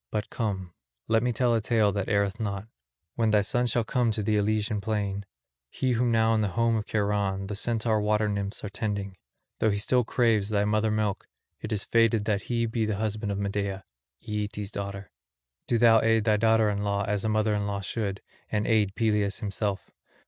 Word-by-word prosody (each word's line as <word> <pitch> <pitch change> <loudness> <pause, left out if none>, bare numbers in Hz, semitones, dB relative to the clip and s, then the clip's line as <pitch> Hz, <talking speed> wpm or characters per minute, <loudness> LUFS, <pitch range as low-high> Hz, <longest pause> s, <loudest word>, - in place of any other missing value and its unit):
But 105 -1 -3
come, 95 -6 -3 0.3
let 115 0 +3
me 125 +1 +1
tell 120 +1 +2
a 115 - +2
tale 110 -2 +2
that 100 -1 -2
erreth 100 0 +1
not. 100 -1 -3 0.5
When 115 -2 +1
thy 105 -1 +4
son 120 +4 +1
shall 120 0 +1
come 120 +1 +1
to 105 - -2
the 105 +1 +1
Elysian 105 0 0
plain, 100 -2 -2 0.4
he 130 - -1
whom 120 0 +2
now 115 0 +3
in 110 - +2
the 105 - +1
home 115 0 +3
of 105 -1 -2
Cheiron 100 -2 0
the 100 +1 -4
Centaur 110 0 0
water 105 0 +1
nymphs 100 0 -3
are 105 - -4
tending, 100 -2 -3 0.4
though 110 - +3
he 100 - 0
still 125 +4 +2
craves 110 -3 +1
thy 105 -1 +1
mother 110 +1 +1
milk, 105 -2 -1 0.3
it 110 - -6
is 105 -2 -1
fated 115 -2 +3
that 105 -2 0
he 115 -1 +1
be 115 0 -1
the 110 -1 0
husband 105 0 -2
of 100 - -2
Medea, 100 -1 -2 0.4
Aeetes' 105 -1 -3
daughter; 100 -1 -6 0.6
do 120 - +2
thou 115 -1 +6
aid 115 -1 +3
thy 105 -1 +3
daughter 110 0 +3
in 100 0 -2
law 100 0 0
as 105 -1 0
a 110 - 0
mother 110 0 +1
in 105 -1 -1
law 100 -1 -2
should, 100 -1 -3 0.3
and 105 -1 0
aid 105 -3 +2
Peleus 105 -1 +1
himself. 100 -1 -3
105 Hz, 205 wpm, -27 LUFS, 100-110 Hz, 0.6 s, thou